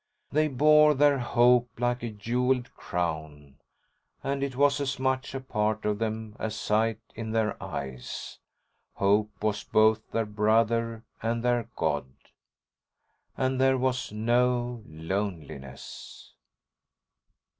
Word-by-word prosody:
They 155 +2 +3
bore 150 +2 +5
their 145 0 +4
hope 120 0 +4
like 120 0 0
a 120 - -3
jeweled 120 +4 -1
crown, 80 -5 -4 0.6
and 140 0 -1
it 140 -2 -2
was 145 +1 +3
as 135 0 -1
much 130 +1 -1
a - - -2
part 110 -4 -1
of 105 -1 0
them 110 -1 -3
as 110 -1 -3
sight 110 +1 +1
in 110 0 -5
their 110 -1 +1
eyes. 65 -3 -6 0.6
Hope 105 +2 +2
was 105 -1 0
both 110 0 +3
their 115 -1 0
brother 115 +2 +1 0.2
and 115 +1 -1
their 120 -2 +1
god. 75 -4 0 1.3
And 130 0 0
there 130 0 +4
was 125 -2 -1
no 120 +2 +1
loneliness. 80 -5 -6
115 Hz, 120 wpm, -28 LUFS, 105-130 Hz, 1.3 s, bore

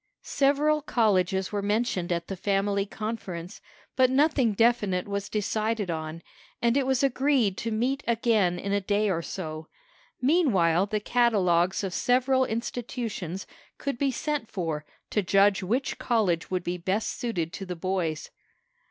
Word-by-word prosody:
Several 295 +2 +2
colleges 190 -8 +1
were 205 -1 -1
mentioned 205 -4 0
at 170 -1 -1
the 195 - -4
family 200 +1 0
conference, 195 -6 -6 0.3
but 260 -2 +4
nothing 270 -4 +3
definite 205 -5 +2
was 200 0 -3
decided 215 -1 -1
on, 160 0 -5 0.4
and 235 +1 +2
it 275 -2 +1
was 265 0 +1
agreed 265 -6 +2
to 230 - -3
meet 245 +5 0
again 220 -6 +2
in 200 +3 -4
a 200 0 +1
day 205 +1 +1
or 170 -2 -1
so. 160 -3 -6 0.5
Meanwhile 205 - +3
the 215 +1 -1
catalogues 190 -6 +2
of 190 -2 -3
several 260 +3 +2
institutions 225 -6 -4 0.3
could 275 -4 -3
be 280 - +2
sent 280 -1 -2
for 160 -5 -3 0.2
to 210 - +2
judge 195 +1 +3
which 235 +9 -1
college 200 -9 +1
would 185 -1 -1
be 175 +1 -2
best 190 +5 -2
suited 175 -9 -2
to 195 - -6
the 180 - -4
boys. 170 -3 -2
205 Hz, 150 wpm, -27 LUFS, 180-240 Hz, 0.5 s, but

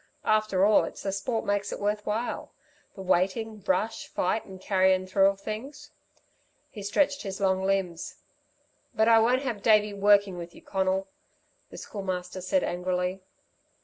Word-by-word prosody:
After 215 -3 +3
all, 210 0 +5
it's - - -7
the 195 - -1
sport 220 +4 -2
makes 205 0 -1
it - - -5
worth 210 +1 -2
while 220 +3 -2 0.5
the 190 - -8
waiting, 195 +4 0
rush, 205 +5 0
fight 185 +5 -1
and 190 -1 -11
carryin' 190 -1 +2
through 195 +1 +4
of 195 0 0
things." 230 +8 -7 0.8
He 210 - -8
stretched 280 +8 +1
his 195 -2 -5
long 190 -1 +2
limbs. 190 -3 -1 0.8
"But 220 - +3
I 225 -1 +7
won't 250 +4 +2
have 235 -6 -3
Davey 210 -1 +4
'working' 200 -2 +3
with 170 0 -9
you, - - -14
Conal," 190 0 0 0.6
the - - -11
Schoolmaster 185 -2 -5
said 270 +10 +1
angrily. 180 +1 -2
195 Hz, 155 wpm, -27 LUFS, 185-215 Hz, 0.8 s, I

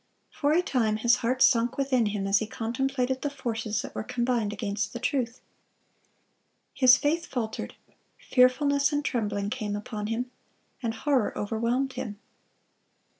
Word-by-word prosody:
For 290 0 0
a 345 +3 +3
time 225 -9 +1
his 235 +2 +4
heart 255 +2 +1
sunk 240 +1 +3
within 260 -5 +2
him 205 -1 -2
as 195 +1 +3
he 220 - -3
contemplated 255 +3 -1
the 290 - -1
forces 225 -6 -3
that - - -8
were - - -3
combined 240 -2 -1
against 205 -1 -3
the 240 - -5
truth. 250 -2 -1 1.3
His 255 -1 +7
faith 330 +4 0
faltered; 225 -4 -4 0.4
fearfulness 280 +3 +3
and 290 0 -1
trembling 205 -4 -1
came 215 -5 -3
upon 210 0 -5
him, 245 +3 -3 0.5
and 225 -2 -2
horror 260 -1 0
overwhelmed 235 +5 -1
him. 205 -3 -5
240 Hz, 145 wpm, -27 LUFS, 220-265 Hz, 1.3 s, His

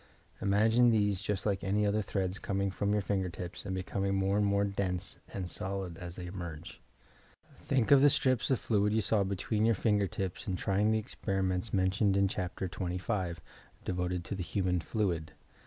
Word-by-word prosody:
Imagine 110 +5 +4
these 105 -4 +2
just 105 -2 -2
like 100 -2 0
any 105 +2 +1
other 105 +1 +2
threads 95 -2 -2
coming 100 0 -1
from 100 +1 -1
your 105 -1 +1
finger 95 -2 0
tips 85 +3 -7
and 95 - -2
becoming 95 +1 -1
more 95 +1 +1
and 105 0 +3
more 100 0 +2
dense 100 -2 -2
and 95 -2 -4
solid 95 -3 -4
aa 90 - -5
they 90 +1 -7
emerge. 85 -3 -7 0.7
Think 130 -4 0
of 140 -1 +8
the 145 - +7
strips 130 -3 +1
of 130 - +2
fluid 105 -2 +1
you 110 - +3
saw 105 0 +2
between 100 +3 -1
your 115 0 +4
finper 105 0 +2
tips 95 -2 -4
in 95 - 0
trying 100 +3 +1
the 110 - +3
experiments 95 -2 -2
mentioned 95 +1 +2
in 100 0 +4
Chapter 95 0 -3
XSV, 90 0 -2 0.5
devoted 90 -1 -2
to - - -4
"the 95 - -4
human 90 0 0
fluid." 85 -5 -2
100 Hz, 185 wpm, -31 LUFS, 90-105 Hz, 0.7 s, of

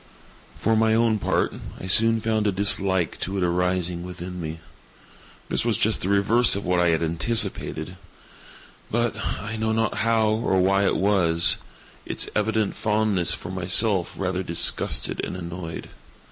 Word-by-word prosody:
For 110 +1 +1
my 110 0 +2
own 115 -2 +2
part, - - 0 0.3
I - - -8
soon 115 +4 +4
found 110 -1 -1
a - - +2
dislike 95 -2 +1
to 95 +2 -3
it 95 - -1
arising 90 0 -1
within 90 0 -7
me. 80 0 -6 0.9
This - - -1
was - - 0
just - - +1
the 95 - -2
reverse 105 +4 +4
of 100 - -5
what 90 -1 +1
I 90 - +3
had 80 0 +1
anticipated; 90 -1 0 0.9
but—I 115 -1 -3
know 110 0 -1
not 115 0 -1
how 110 -1 +1
or 110 -3 0
why 100 +2 +2
it - - +1
was—its 90 -4 +1
evident 105 -1 0
fondness 105 -5 +1
for 90 - -9
myself 95 +1 +1
rather 95 -1 -2
disgusted 85 -2 0
and 90 - -5
annoyed. 85 -1 -7
95 Hz, 145 wpm, -23 LUFS, 90-110 Hz, 0.9 s, soon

